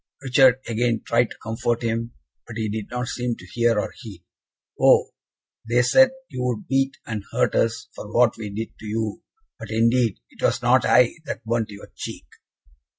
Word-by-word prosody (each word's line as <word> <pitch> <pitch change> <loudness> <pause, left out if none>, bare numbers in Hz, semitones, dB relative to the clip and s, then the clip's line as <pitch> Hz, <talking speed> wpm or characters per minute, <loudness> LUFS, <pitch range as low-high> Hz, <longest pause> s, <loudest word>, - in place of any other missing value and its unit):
Richard 130 -1 +5
again 115 0 0
tried 120 0 +2
to - - -11
comfort 115 +1 -1
him, 115 0 -2 0.3
but 115 -1 -8
he 110 -1 -1
did 105 0 -4
not 125 0 -3
seem 120 -1 -2
to 90 - -14
hear 115 +3 +1
or - - -3
heed. 95 -6 -11 0.6
"Oh! - - +5 0.6
they 120 +1 +4
said 265 - +6 0.2
you 125 - -6
would 125 -3 -2
beat 135 0 +1
and 110 -3 -4
hurt - - +1
us 115 +3 0
for 105 - -9
what 120 0 +4
we 110 -2 -6
did 110 +3 -4
to 110 - -9
you! 110 +5 -3 0.4
but, - - -8
indeed, 115 -1 +2
it - - -16
was - - +1
not - - +4
I 125 -1 +4
that 115 - -6
burnt 115 -1 0
your 100 -1 -11
cheek!" - - -7
115 Hz, 185 wpm, -23 LUFS, 110-125 Hz, 0.6 s, said